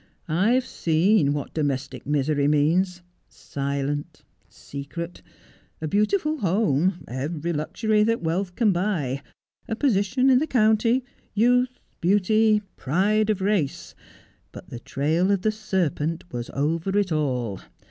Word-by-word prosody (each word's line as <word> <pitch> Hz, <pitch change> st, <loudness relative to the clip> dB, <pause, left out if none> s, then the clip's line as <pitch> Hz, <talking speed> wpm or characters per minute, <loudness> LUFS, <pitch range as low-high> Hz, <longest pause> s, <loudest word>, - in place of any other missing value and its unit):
I've 215 Hz, +11 st, +2 dB
seen 165 Hz, -1 st, +2 dB
what 145 Hz, -1 st, -4 dB
domestic 135 Hz, -4 st, -3 dB
misery 145 Hz, 0 st, +1 dB
means 175 Hz, +5 st, +2 dB, 0.2 s
— -, -, -45 dB, 0.2 s
silent 140 Hz, +1 st, -3 dB, 0.2 s
— -, -, -37 dB
secret. 155 Hz, +5 st, -7 dB, 0.6 s
A 155 Hz, -, -3 dB
beautiful 305 Hz, -, +1 dB
home 180 Hz, -, +1 dB
— -, -, -32 dB
every 150 Hz, +6 st, -3 dB
luxury 210 Hz, +8 st, 0 dB
that 230 Hz, -3 st, 0 dB
wealth 180 Hz, +3 st, -1 dB
can 225 Hz, -4 st, +3 dB
buy 170 Hz, -8 st, -1 dB, 0.2 s
— 135 Hz, -, -42 dB
a 225 Hz, -, -1 dB
position 235 Hz, +1 st, +2 dB
in 255 Hz, -, +5 dB
the 310 Hz, -, -1 dB
county 230 Hz, +1 st, +2 dB
— -, -, -35 dB
youth 250 Hz, +3 st, +2 dB
— -, -, -43 dB
beauty 210 Hz, +3 st, +3 dB
— -, -, -42 dB
pride 210 Hz, +9 st, +1 dB
of 205 Hz, -3 st, 0 dB
race. 190 Hz, -8 st, -1 dB, 0.6 s
But 180 Hz, -, -12 dB
the 120 Hz, -, -6 dB
trail 160 Hz, +9 st, 0 dB
of 200 Hz, -2 st, +1 dB
the 215 Hz, -, +3 dB
serpent 175 Hz, -7 st, -2 dB
was 120 Hz, -1 st, -4 dB
over 165 Hz, +7 st, 0 dB
it 200 Hz, -3 st, +1 dB
all. 125 Hz, -10 st, -1 dB
180 Hz, 145 wpm, -24 LUFS, 145-215 Hz, 0.6 s, in